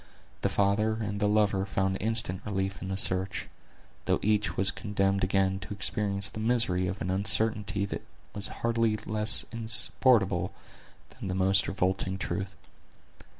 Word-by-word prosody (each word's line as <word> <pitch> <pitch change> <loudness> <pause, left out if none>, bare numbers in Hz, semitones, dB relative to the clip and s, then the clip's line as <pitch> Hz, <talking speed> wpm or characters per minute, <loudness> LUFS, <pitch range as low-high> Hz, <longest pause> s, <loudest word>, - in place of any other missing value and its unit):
The - - +1
father 100 +2 +2
and 105 -2 -3
the 105 - +2
lover 105 -2 +2
found 95 -1 -1
instant 110 -3 0
relief 95 -2 -3
in 95 - -5
the 95 0 -3
search; 95 0 +1 0.6
though - - +2
each 105 -4 +1
was 95 +1 +3
condemned 100 -2 0
again 95 0 +1
to 95 +2 -7
experience 100 -1 -1
the 110 - -7
misery 110 -6 +1
of 95 +2 -4
an 90 - -2
uncertainty 100 +1 +1
that - - -5 0.3
was 105 -1 +2 0.2
hardly 115 -2 +2
less 105 0 0
insupportable 110 -3 +2 0.6
than - - -8
the 95 - -2
most 95 +2 +2
revolting 95 0 0
truth. 95 0 -4
100 Hz, 150 wpm, -29 LUFS, 95-110 Hz, 0.6 s, was